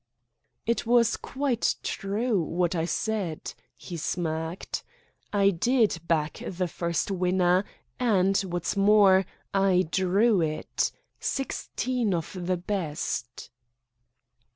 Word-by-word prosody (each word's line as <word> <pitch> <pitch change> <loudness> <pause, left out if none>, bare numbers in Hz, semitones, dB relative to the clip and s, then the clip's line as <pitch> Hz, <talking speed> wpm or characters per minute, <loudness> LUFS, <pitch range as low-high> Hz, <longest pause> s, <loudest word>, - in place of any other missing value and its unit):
"It 235 0 0
was 235 -1 +4
quite 265 -4 -1
true 205 +1 0
what 170 +2 0
I 165 -2 0
said," 190 -4 -2 0.2
he 175 - -7
smirked. 160 +1 -3 0.5
"I 200 -1 +4
did 220 +1 +2
back 155 -2 0
the 180 -1 -2
first 170 +2 -2
winner, 180 0 +2 0.3
and, 195 -6 +3
what's 175 -2 -2
more, 195 -2 +5 0.3
I 195 -2 +3
drew 195 +2 +3
it 155 -1 -1 0.3
sixteen 250 -5 -1
of 165 +3 -4
the 185 -1 +1
best." 155 - -3
190 Hz, 105 wpm, -27 LUFS, 170-210 Hz, 0.5 s, more